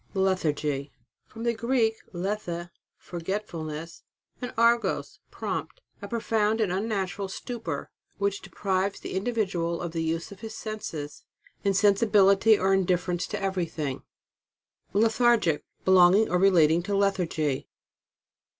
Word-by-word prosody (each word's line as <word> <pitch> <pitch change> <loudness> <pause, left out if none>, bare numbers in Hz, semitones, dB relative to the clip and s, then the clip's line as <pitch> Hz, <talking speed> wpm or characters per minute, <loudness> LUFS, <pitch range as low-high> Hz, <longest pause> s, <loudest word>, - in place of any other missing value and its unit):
LETHARGY. 150 -7 0 0.4
From 225 +1 -9
the 235 0 +2
Greek, 230 0 +1 0.2
lethe, 175 -2 -3 0.3
fbrgetfulness, 165 -3 -5 0.4
and 245 - -4
argos, 235 +1 +2
prompt. - - -4 0.2
A - - -6
profound 225 -2 0
and 210 -5 +1
unnatural 195 -1 -2
stupor, 190 - -5 0.3
which 200 0 -1
deprives 195 0 -1
the - - -7
individual 190 -5 -1
of 170 -2 -4
the 165 0 -2
use 165 +5 -2
of 200 - -11
his 220 0 -7
senses. 165 -9 -6 0.4
Insensibility 200 +1 +4
or 190 0 +2
indifference 180 -2 +1
to - - -4
everything. 170 -8 -2 0.9
LETHARGIC. 220 -5 +3 0.2
Belonging 190 +3 +6
or 180 - +3
relating 170 -4 +5
to 200 +3 -2
lethargy. 170 -8 0
195 Hz, 115 wpm, -27 LUFS, 170-215 Hz, 0.9 s, Belonging